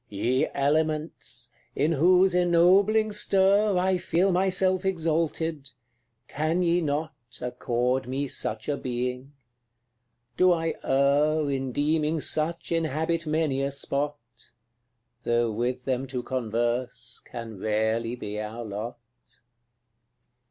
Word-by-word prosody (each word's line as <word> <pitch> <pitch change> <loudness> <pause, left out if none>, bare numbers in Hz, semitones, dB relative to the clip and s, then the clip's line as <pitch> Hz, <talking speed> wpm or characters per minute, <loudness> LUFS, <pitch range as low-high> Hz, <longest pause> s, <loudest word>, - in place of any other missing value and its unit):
Ye 120 +6 0
Elements! 155 +2 -1 0.2
in 150 +4 +1
whose 180 +4 +4
ennobling 185 +5 +4
stir 200 0 +3
I 185 0 +2
feel 180 +3 +1
myself 185 0 +1
exalted 165 -4 -1 0.6
can 160 +4 0
ye 175 +1 +2
not 155 +1 -2 0.3
Accord 125 +1 -1
me 135 +2 -2
such 110 -3 -4
a 145 - 0
being? 125 +2 -4 1.0
Do 185 -1 +5
I 165 -1 -1
err 145 +3 +2
In 135 -1 -2
deeming 155 +3 +1
such 160 +4 -1
inhabit 165 +1 -1
many 155 -3 0
a 140 0 -1
spot? 140 +1 -2 1.1
Though 120 -1 +1
with 125 +3 -2
them 130 0 -1
to 125 -2 -4
converse 120 0 -2
can 115 -4 -8
rarely 110 +3 0
be 105 -3 -5
our 110 +3 -6
lot. 110 +3 -5
145 Hz, 110 wpm, -26 LUFS, 125-170 Hz, 1.1 s, Do